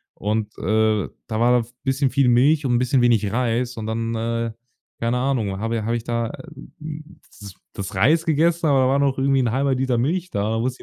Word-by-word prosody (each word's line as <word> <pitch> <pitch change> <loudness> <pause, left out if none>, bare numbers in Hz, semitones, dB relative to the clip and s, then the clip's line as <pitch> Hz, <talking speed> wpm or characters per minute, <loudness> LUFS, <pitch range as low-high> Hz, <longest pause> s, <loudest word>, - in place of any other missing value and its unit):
Und, 105 +1 -3
äh, 110 -2 +1 0.2
da 110 -1 -3
war 120 +1 +4
da - - -5
v 115 - -17
bisschen 135 0 +1
viel 135 0 +2
Milch 140 +5 +3
und 120 -2 +2
bisschen 125 +1 +2
wenig 110 -4 +2
Reis 120 +1 -1
und 110 - -5
dann, 115 +1 -2
äh, 115 0 -2 0.5
keine 115 +2 0
Ahnung, 125 -7 -1
habe 115 +2 -2
i - - -2
habe 115 +2 -1
ich 115 - -3
da, 115 0 -2
äh, - - -9 0.4
hm, 155 +1 -9 0.2
das 100 -2 -10 0.2
das 100 0 -6
Reis 155 - +3
gegessen, 165 +2 +2
aber 140 -2 +4
da 130 - +3
war 135 +1 +2
noch 140 -1 +1
irgendwie 135 0 +2
'n 120 -3 0
1/2 135 +2 +1
Liter 130 -1 0
Milch 170 +9 -1
da. 100 +1 -1
Da 115 0 -1
wusste 130 +1 -3
120 Hz, 225 wpm, -22 LUFS, 115-135 Hz, 0.5 s, war